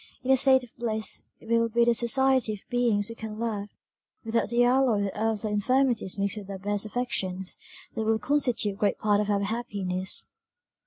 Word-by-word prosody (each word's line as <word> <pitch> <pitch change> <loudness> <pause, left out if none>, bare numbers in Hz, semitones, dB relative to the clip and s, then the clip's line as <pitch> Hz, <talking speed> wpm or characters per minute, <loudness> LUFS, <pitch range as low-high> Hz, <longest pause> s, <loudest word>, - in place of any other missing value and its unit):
In 260 - +1
a - - +7
state 265 0 +4
of 240 - -14
bliss, 220 -2 -4
it - - -16
will 230 0 +2
be 235 +1 +3
the 235 - +4
society 255 0 +2
of 200 - -17
beings 235 -4 +1
we - - -5
can 220 -2 -7
love, 215 -3 -3 0.6
without 225 -1 0
the 240 +1 +3
alloy 245 -4 +3
that 200 - -2
earthly 215 0 -1
infirmities 235 -1 +1
mix 200 0 0
with 200 -2 -8
our 195 - -5
best 205 +2 -2
affections, 190 -6 -2 0.3
that 225 - -3
will 220 0 +2
constitute 235 -6 0
great 205 - +1
part 210 -1 +2
of 210 - -3
our 200 -1 +1
happiness. 195 -4 -2
220 Hz, 190 wpm, -27 LUFS, 205-240 Hz, 0.6 s, a